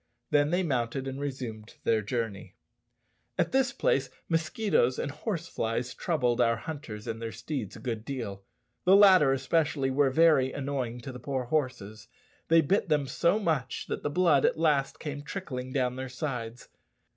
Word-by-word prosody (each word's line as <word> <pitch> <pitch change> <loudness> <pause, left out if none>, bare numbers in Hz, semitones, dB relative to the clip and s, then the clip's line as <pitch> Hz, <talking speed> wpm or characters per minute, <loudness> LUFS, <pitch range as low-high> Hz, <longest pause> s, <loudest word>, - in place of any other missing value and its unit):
Then 145 0 +4
they 180 +3 +1
mounted 130 -3 -1
and 135 +1 -5
resumed 125 -6 -5
their 110 -1 +2
journey. 110 -2 -4 0.8
At - - +1
this 265 0 +2
place - - +1 0.2
mosquitoes 165 - +1
and 145 - -2
horse 170 +1 -4
flies 115 -1 -2
troubled 125 -9 0
our 115 -1 +3
hunters 115 -5 -7
and 115 0 -4
their 115 -1 -4
steeds 130 -9 -5
a - - -9
good 115 -3 -4
deal. 115 -7 -5 0.4
The 185 +2 +6
latter 190 -8 +7
especially 135 0 +1
were 140 +1 +3
very 140 -2 +4
annoying 130 -4 -3
to 130 - -7
the 125 - -9
poor 130 +1 -2
horses. 120 -7 -3 0.4
They 165 0 +6
bit 190 +7 +1
them 150 -2 +2
so 170 +8 +2
much 160 - -1
that - - -3
the - - -1
blood 160 -3 +3
at - - +2
last 150 -4 +1
came 145 -2 -5
trickling 135 -6 -5
down 125 -2 0
their 130 0 -5
sides. 125 -3 -5
135 Hz, 170 wpm, -29 LUFS, 120-160 Hz, 0.8 s, latter